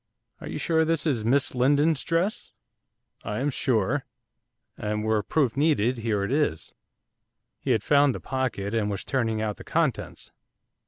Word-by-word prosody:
'Are - - -8
you - - -4
sure 160 -1 +2
this 160 -2 0
is 130 -9 0
Miss 130 +5 +2
Lindon's 145 +4 +3
dress?' 170 +6 0 0.7
'I 105 - -3
am 140 +3 0
sure, 130 +1 0 0.7
and 105 0 -3
were 110 -1 +1
proof 130 +2 0
needed, 130 -5 +2
here 110 -3 0
it 100 - -2
is.' 145 - -1 0.9
He - - -5
had 115 -5 +2
found 140 0 +4
the - - -5
pocket, 130 -6 -3
and 110 -2 0
was 100 -2 -3
turning 115 -5 -1
out 105 -2 -3
the - - -10
contents. - - -2
130 Hz, 160 wpm, -26 LUFS, 110-145 Hz, 0.9 s, found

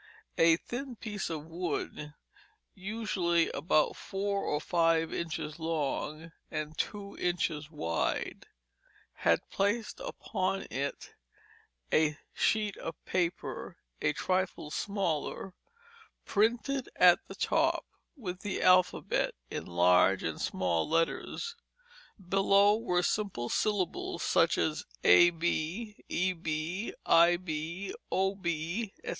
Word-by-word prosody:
A 165 0 +6
thin 245 +6 -6
piece 210 -5 -4
of 155 -2 -4
wood, 165 -3 -4 0.6
usually 190 -4 0
about 155 0 +2
four 200 +1 -2
or 150 - 0
five 165 0 +2
inches 155 -1 -4
long 160 0 -2 0.2
and 155 +1 -4
two 200 +2 -4
inches 165 -4 -1
wide, 85 - -2 0.7
had - - +1
placed 210 +3 0
upon 190 +1 -2
it 140 +1 -4 0.8
a 155 -1 +3 0.2
sheet 215 -2 +1
of 165 - -5
paper 180 -2 -2 0.2
a - - +3
trifle 185 -5 -1
smaller, 195 -2 -2 0.7
printed 240 +5 +1
at 180 -1 +7
the - - -9
top - - +1 0.3
with 185 -7 -5
the 205 0 -3
alphabet 185 -1 +3 0.2
in - - -4
large 90 +2 +4
and 80 -1 -3
small 90 - 0
letters; 165 - -1 0.7
below 195 +2 +5
were 180 -6 0
simple 185 - -1
syllables 205 -5 -1
such - - +3
as - - 0 0.2
ab, 165 - +6
eb, 180 0 -2
ib, 160 +7 -2 1.2
ob, 190 -1 0
etc. 170 +4 -1
175 Hz, 105 wpm, -31 LUFS, 155-200 Hz, 1.2 s, at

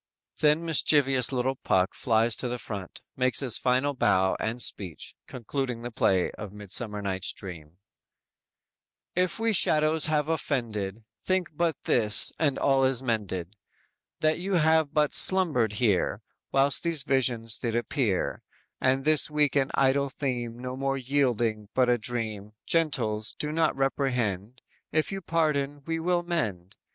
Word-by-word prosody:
"_ - - -25
Then 155 +2 +2
mischievous 140 -5 +2
little 130 0 0
Puck 95 -5 +1
flies 115 -1 +1
to 125 - -1
the 125 0 -3
front, 100 -5 -8
makes 130 0 +2
his 125 -5 +1
final 130 +3 +1
bow 95 -7 +2
and 115 +3 -3
speech, 95 -8 -2
concluding 125 -1 -4
the 120 - -5
play 95 -5 +1
of 105 -2 -9
"Midsummer 105 +1 -1
Night's 95 -1 -1
Dream": 85 -4 -9 1.4
_"If 180 0 0
we 225 0 +1
shadows 155 -3 +3
have 150 -1 0
offended, 115 -10 -3 0.2
Think 185 -1 -1
but 170 -1 0
this, 110 -3 +3
and 145 -4 +1
all 135 -1 +2
is 130 -1 +2
mended 105 -6 -3 0.7
That 155 +1 +1
you 195 +2 -3
have 160 -2 +3
but 150 -1 +1
slumbered 155 - +3
here, 105 -3 0 0.3
While 135 +1 +2
these 165 -5 +1
visions 120 -5 +2
did 115 -2 -2
appear; 120 - -1 0.4
And 130 +1 +1
this 155 -1 +4
weak 150 -2 +1
and 135 -2 +2
idle 135 +1 +2
theme 120 -4 -4
No 125 +1 -6
more 135 0 -2
yielding 120 -6 -1
but 125 -1 +3
a 120 -1 +2
dream; 110 -3 -2
Gentles, 115 -10 0
do 150 - -2
not 160 0 +1
reprehend; 125 -5 -2 0.3
If 155 +4 0
you 195 0 -5
pardon 145 -4 -1
we 165 0 -2
will 175 +1 0
mend. 105 - -3
130 Hz, 150 wpm, -27 LUFS, 110-150 Hz, 1.4 s, this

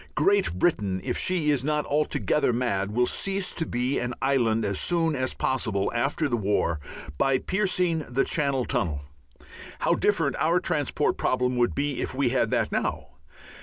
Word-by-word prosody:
Great 195 - +2
Britain, 100 - +1
if - - -2
she 170 -5 +1
is 135 -3 +1
not 150 +1 0
altogether 150 -1 +1
mad, 115 -5 -1
will 125 +3 +2
cease 195 +7 -1
to 165 - -2
be 125 +3 -1
an 125 0 -3
island 115 -5 +1
as 100 -1 -1
soon 165 -3 +1
as 130 -1 -1
possible 110 -7 0
after 140 +6 0
the 120 - 0
war, 100 -6 0 0.4
by 135 -1 +3
piercing 180 -1 0
the 125 +3 +1
Channel 140 -5 0
Tunnel 75 -6 -1 0.8
how - - +3
different - - +1
our - - +3
transport - - 0
problem 125 0 0
would 120 -1 +1
be 145 -1 -1
if - - -4
we 135 -2 +2
had 120 -3 +1
that - - 0
now! - - -2
130 Hz, 165 wpm, -26 LUFS, 115-150 Hz, 0.8 s, by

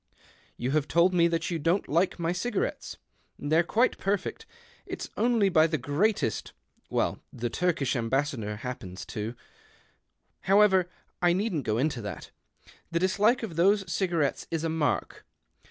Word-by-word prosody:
You 125 +2 -2
have 150 0 +1
told 170 +2 +3
me 170 -1 +4
that 170 +1 -1
you 165 - -1
don't 170 +6 +1
ike 170 +7 +1
my 170 -1 -1
cigarettes. 245 - -2 0.4
They're 155 +3 +2
quite 225 +8 +1
perfect. 205 - -2 0.4
't's - - -5
only 230 -4 +3
by 165 -4 +4
the 160 -1 -1
greatest 145 - 0 0.2
— - - -40
well, - - 0
the 120 -1 -4
Turkish 165 -7 0
Embassador 120 -2 -1
happens 105 -5 -7
to. 110 +1 -5 1.1
However, 195 -3 +5 0.3
I 175 -1 +4
leedn't 180 - -1
go 110 0 0
into 135 -1 0
that. 105 - -7 0.6
The 170 - -1
dislike 205 +7 +2
of 175 -8 -5
those 195 +1 +3
cigarettes 170 -7 0
is 165 -1 -2
a 165 - 0
mark. 160 -2 -1
165 Hz, 150 wpm, -28 LUFS, 140-190 Hz, 1.1 s, However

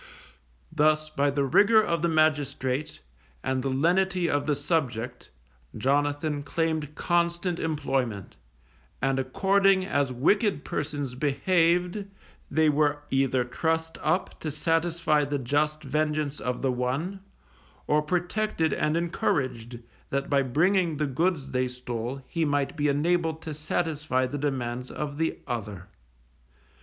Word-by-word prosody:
Thus 155 0 +2
by 145 -1 +1
the 140 0 0
rigour 205 - +5
of 170 -6 +1
the 170 - +2
magistrate, 145 -3 0 0.4
and 130 0 0
the 135 - -1
lenity 175 +6 +2
of 145 -2 0
the 150 - +2
subject, 130 -5 -2 0.5
Jonathan 145 +4 0
claimed 155 0 -2
constant 170 +1 0
employment, 135 - -2 0.6
and 135 +1 +1
according 190 +7 +3
as 145 -7 0
wicked 155 - +1
persons 145 -3 -3
behaved, 175 +7 +1 0.5
they 155 +2 +3
were 145 0 +2
either 135 -2 +2
trussed 160 +5 -2
up 165 +5 -1
to 155 - -3
satisfy 165 0 +1
the 145 0 -1
just 150 +4 0
vengeance 150 0 -1
of 125 +1 -3
the 135 - +2
one, 130 +10 -2 0.7
or 150 0 +3
protected 175 +1 0
and 155 +1 +1
encouraged, 130 -8 -1 0.3
that 140 +1 -2
by 140 -1 +4
bringing 165 +5 +2
the 150 - 0
goods 145 0 -1
they 130 -1 +1
stole 125 +1 -5
he 165 -2 -1
might 145 -1 0
be 150 -2 +1
enabled 160 +2 +1
to 155 - -5
satisfy 150 -3 -1
the 140 +3 -4
demands 125 -3 -2
of 145 -1 -5
the 160 - 0
other. 105 -6 -5
150 Hz, 130 wpm, -27 LUFS, 135-165 Hz, 0.7 s, rigour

